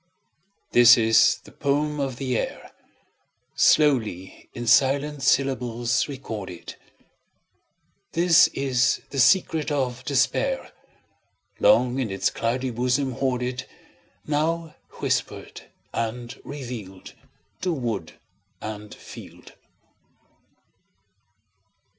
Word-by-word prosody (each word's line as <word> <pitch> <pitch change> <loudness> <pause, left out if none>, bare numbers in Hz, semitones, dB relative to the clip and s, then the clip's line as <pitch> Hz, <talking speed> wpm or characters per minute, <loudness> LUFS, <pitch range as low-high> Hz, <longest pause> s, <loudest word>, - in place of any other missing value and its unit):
This 120 0 +8
is 115 -1 +4
the - - -15
poem 150 +1 -1
of 135 -3 -2
the 130 -1 -2
air, - - -4 0.8
Slowly 110 - +2
in 120 - -6
silent 140 +4 +2
syllables 125 -3 +1
recorded; 110 - -7 1.4
This 170 -1 +5
is 130 -2 0
the 140 - -3
secret 160 +1 +3
of 130 -4 -2
despair, - - 0 0.9
Long 125 - +4
in 125 -5 -1
its 95 0 -1
cloudy 125 +3 -2
bosom 125 +3 0
hoarded, 125 0 -2 0.6
Now 160 +2 -1 0.2
whispered - - -3 0.3
and 120 +1 -4
revealed 120 -9 -8 0.5
To 185 - 0
wood 115 - -3 0.5
and 105 -1 -8
field. - - -13
130 Hz, 85 wpm, -24 LUFS, 120-145 Hz, 1.4 s, This